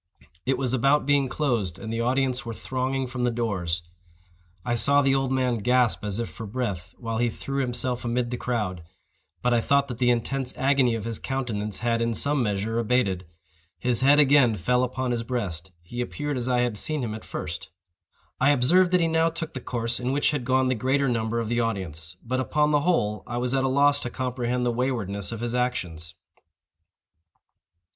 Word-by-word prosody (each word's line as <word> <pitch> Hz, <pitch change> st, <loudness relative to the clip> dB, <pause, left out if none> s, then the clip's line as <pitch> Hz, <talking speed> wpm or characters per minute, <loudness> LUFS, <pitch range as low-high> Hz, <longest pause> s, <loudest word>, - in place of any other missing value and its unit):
It 135 Hz, -1 st, +2 dB
was 130 Hz, -1 st, 0 dB
about 135 Hz, +3 st, +3 dB
being 140 Hz, -2 st, +3 dB
closed, 115 Hz, -, 0 dB
and 110 Hz, +2 st, -6 dB
the 115 Hz, -, -1 dB
audience 130 Hz, +1 st, +1 dB
were 115 Hz, -1 st, -6 dB
thronging 130 Hz, +2 st, -2 dB
from 125 Hz, 0 st, -4 dB
the 125 Hz, -, +3 dB
doors. 95 Hz, -8 st, -2 dB, 0.8 s
I 120 Hz, -, 0 dB
saw 140 Hz, +5 st, +4 dB
the 135 Hz, 0 st, +3 dB
old 135 Hz, -1 st, +1 dB
man 130 Hz, -3 st, +1 dB
gasp 125 Hz, +1 st, +2 dB
as 105 Hz, -1 st, -2 dB
if 115 Hz, -1 st, -2 dB
for 115 Hz, -, -8 dB
breath 100 Hz, -7 st, -4 dB
while 115 Hz, -2 st, -3 dB
he 120 Hz, 0 st, +2 dB
threw 135 Hz, +4 st, -3 dB
himself 125 Hz, 0 st, -1 dB
amid 120 Hz, 0 st, -1 dB
the -, -, -1 dB
crowd; 105 Hz, -9 st, -2 dB, 0.6 s
but 125 Hz, -, +3 dB
I 120 Hz, -, +3 dB
thought 140 Hz, +3 st, +2 dB
that 120 Hz, -2 st, -6 dB
the 125 Hz, -1 st, +3 dB
intense 125 Hz, +2 st, -1 dB
agony 135 Hz, -3 st, +3 dB
of 110 Hz, -, -4 dB
his 115 Hz, -1 st, -3 dB
countenance 110 Hz, -6 st, -3 dB
had, 115 Hz, -1 st, +1 dB
in 115 Hz, 0 st, 0 dB
some 145 Hz, +2 st, +1 dB
measure, 110 Hz, +1 st, -1 dB
abated. 105 Hz, -7 st, +1 dB, 0.5 s
His 125 Hz, -2 st, 0 dB
head 140 Hz, +2 st, +6 dB
again 140 Hz, -5 st, +5 dB
fell 125 Hz, +7 st, +1 dB
upon 125 Hz, 0 st, -2 dB
his 120 Hz, -1 st, 0 dB
breast; 95 Hz, -7 st, -4 dB
he 120 Hz, +8 st, -5 dB
appeared 145 Hz, +3 st, -3 dB
as 125 Hz, 0 st, -2 dB
I 125 Hz, -1 st, +3 dB
had 120 Hz, -3 st, -1 dB
seen 150 Hz, +4 st, -2 dB
him 110 Hz, -3 st, -3 dB
at 110 Hz, -, -7 dB
first. 85 Hz, +1 st, -6 dB, 0.7 s
I 140 Hz, -, +4 dB
observed 150 Hz, +7 st, +4 dB
that 180 Hz, -, +5 dB
he 165 Hz, -, +3 dB
now 160 Hz, 0 st, +3 dB
took 165 Hz, -1 st, -5 dB
the 130 Hz, -, -5 dB
course 120 Hz, -1 st, -2 dB
in 125 Hz, +1 st, -1 dB
which 145 Hz, +2 st, +2 dB
had 145 Hz, -5 st, -2 dB
gone 130 Hz, 0 st, +3 dB
the 130 Hz, -, +2 dB
greater 130 Hz, +3 st, +1 dB
number 115 Hz, -1 st, 0 dB
of 115 Hz, -, -2 dB
the 120 Hz, +1 st, 0 dB
audience—but, 95 Hz, -, -3 dB
upon 150 Hz, +3 st, +1 dB
the 145 Hz, -1 st, +3 dB
whole, 105 Hz, -, +1 dB
I 120 Hz, -, -3 dB
was 125 Hz, +1 st, -1 dB
at 135 Hz, -1 st, +2 dB
a -, -, +2 dB
loss 145 Hz, +2 st, +4 dB
to 125 Hz, -, -3 dB
comprehend 125 Hz, -1 st, -2 dB
the 120 Hz, -, +2 dB
waywardness 115 Hz, -6 st, -2 dB
of 115 Hz, -1 st, -5 dB
his 120 Hz, 0 st, -2 dB
actions. 90 Hz, -9 st, -2 dB
125 Hz, 200 wpm, -26 LUFS, 115-135 Hz, 0.8 s, head